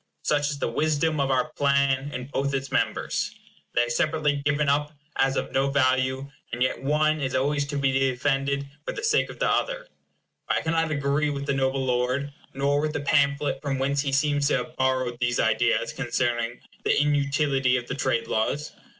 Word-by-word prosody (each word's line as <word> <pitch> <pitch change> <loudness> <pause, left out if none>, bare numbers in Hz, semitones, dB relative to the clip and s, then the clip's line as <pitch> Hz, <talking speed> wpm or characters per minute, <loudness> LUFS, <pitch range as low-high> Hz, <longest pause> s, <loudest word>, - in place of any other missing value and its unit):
Such 145 -1 +1
is 145 - -3
the - - -1
wisdom 155 +4 0
of 135 -1 +1
our 130 +3 +1
plan 140 -1 +2
in 125 -2 -5
both 140 +1 -1
its 135 0 -3
members. 145 - -1 0.4
They 120 - +4
are 120 - -3
separately 150 0 +1
given 145 +1 +1
up 145 +1 +1 0.3
as 135 0 +2
of - - -2
no 135 +1 +1
value, 130 0 +1 0.2
and 120 +1 0
yet 130 - -1
one 155 +2 +1
is 130 -1 -1
always 145 +2 +1
to 145 0 -3
be 140 -1 +2
defended 135 +1 0 0.2
for - - -4
the 415 - -6
sake 455 - +2
of - - -9
the - - +1
other; - - 0 0.6
but - - +1
I - - 0
cannot 165 0 0
agree 145 0 0
with 140 -1 -3
the 140 - 0
noble 135 0 0
lord, 130 +3 0 0.2
nor 140 +1 +1
with 155 0 -1
the 145 - -2
pamphlet 140 -1 +1
from 140 -2 -2
whence 140 +1 +1
he 140 -1 -2
seems 145 +1 +2
to - - +2
have 155 - -6
borrowed 130 -2 0
these 120 -1 0
ideas - - +2
concerning 120 -1 -1 0.2
the - - +3
inutility 140 -3 +2
of 120 - -4
the - - -3
trade 130 -3 0
laws. 140 +7 -1
140 Hz, 195 wpm, -25 LUFS, 130-145 Hz, 0.6 s, They